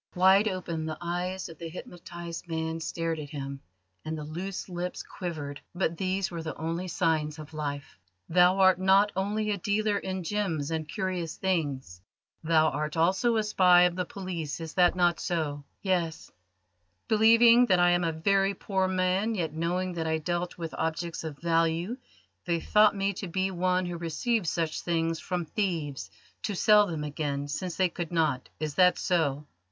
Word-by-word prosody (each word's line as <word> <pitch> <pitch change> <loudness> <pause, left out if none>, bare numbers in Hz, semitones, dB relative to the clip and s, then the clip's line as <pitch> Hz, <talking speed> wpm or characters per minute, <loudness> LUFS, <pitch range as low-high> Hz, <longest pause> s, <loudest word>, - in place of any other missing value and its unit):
Wide 190 +3 +5
open 170 -5 -3
the 155 - -4
eyes 180 +2 -3
of 165 -3 -12
the 165 - -6
hypnotised 170 0 -8
man 160 0 -2
stared 165 0 -2
at 145 -1 -7
him, 140 -2 -6 0.4
and 155 0 -4
the 150 - -5
loose 180 +6 -5
lips 180 0 -4
quivered, 150 -6 -6
but 175 -2 0
these 190 +1 -1
were 170 -1 -4
the 160 0 -5
only 165 +3 -3
signs 160 -3 0
of 155 0 -10
life. 145 -8 -5 0.3
"Thou 180 +2 +5
art 190 -2 +5
not 195 +2 +4
only 210 +3 -1
a 200 - -2
dealer 205 +2 +1
in 190 -1 -4
gems 165 -6 -2
and 160 -1 -3
curious 180 -3 -3
things: 140 - -2 0.4
thou 160 -1 +4
art 155 +2 -3
also 190 +8 +2
a 215 - +2
spy 180 -4 +5
of 180 -1 +2
the 180 - -1
police; 175 -5 -5
is 160 -1 -7
not 180 -1 +4
that 175 -2 +2
so?" 150 -4 -2 0.2
"Yes." 175 -5 -1 0.8
"Believing 230 +2 +6
that 185 - +4
I 175 0 +5
am 175 0 +2
a 165 - +1
very 195 +4 +1
poor 190 0 0
man, 185 +4 +1
yet 165 -5 -2
knowing 175 +3 -1
that 165 -2 -3
I 160 0 +1
dealt 175 +3 -3
with 165 -2 -5
objects 165 +1 -2
of 155 -3 -6
value, 165 - +1 0.5
they 170 -2 0
thought 210 +4 +4
me 195 0 0
to 195 +1 -6
be 190 +2 -1
one 185 0 +1
who 175 -1 -4
receives 175 +4 -1
such 165 -1 -2
things 165 -1 0
from 180 -2 -3
thieves 160 -7 -2 0.3
to 205 - -3
sell 210 +1 +5
them 160 -4 -4
again, 145 -1 -3
since 170 +4 -4
they 185 - +3
could 170 -1 -5
not. 155 -6 0
Is 155 -1 -3
that 180 +3 +5
so?" 150 -5 0
175 Hz, 180 wpm, -28 LUFS, 160-190 Hz, 0.8 s, Believing